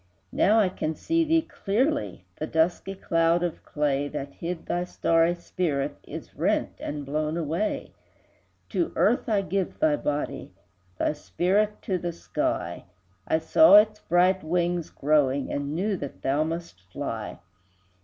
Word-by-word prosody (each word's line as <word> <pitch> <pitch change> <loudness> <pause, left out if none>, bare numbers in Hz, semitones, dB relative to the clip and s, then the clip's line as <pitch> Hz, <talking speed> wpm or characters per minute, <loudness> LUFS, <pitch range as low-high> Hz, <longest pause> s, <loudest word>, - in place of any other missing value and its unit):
Now 215 +3 +3
I 200 -4 +3
can 160 -3 -3
see 330 - +1
thee 325 0 +2
clearly; 265 - -1
The 155 - -3
dusky 175 +5 0
cloud 165 -1 +2
of 175 -2 -3
clay, 145 -1 0
That 140 -1 -6
hid 170 0 -5
thy 175 - -1
starry 165 -1 +2
spirit, 155 -5 -2
Is - - -8
rent - - +1
and 145 -1 -5
blown 155 +3 -1
away: 170 +6 -2 0.8
To 340 - 0
earth 235 +2 +2
I 205 -3 +2
give 190 -1 -2
thy 305 -1 +3
body, 150 - -3 0.4
Thy - - +1
spirit 195 +7 0
to 185 -2 -1
the 175 0 -3
sky, 170 - -3 0.4
I - - +3
saw 200 - +6
its 210 0 +6
bright 180 +2 +2
wings 175 0 0
growing, 140 -2 +1
And 145 +1 -3
knew 200 +4 0
that 140 -4 -8
thou 140 +3 +2
must 165 - -5
fly. 115 -7 -5
170 Hz, 145 wpm, -26 LUFS, 150-195 Hz, 0.8 s, saw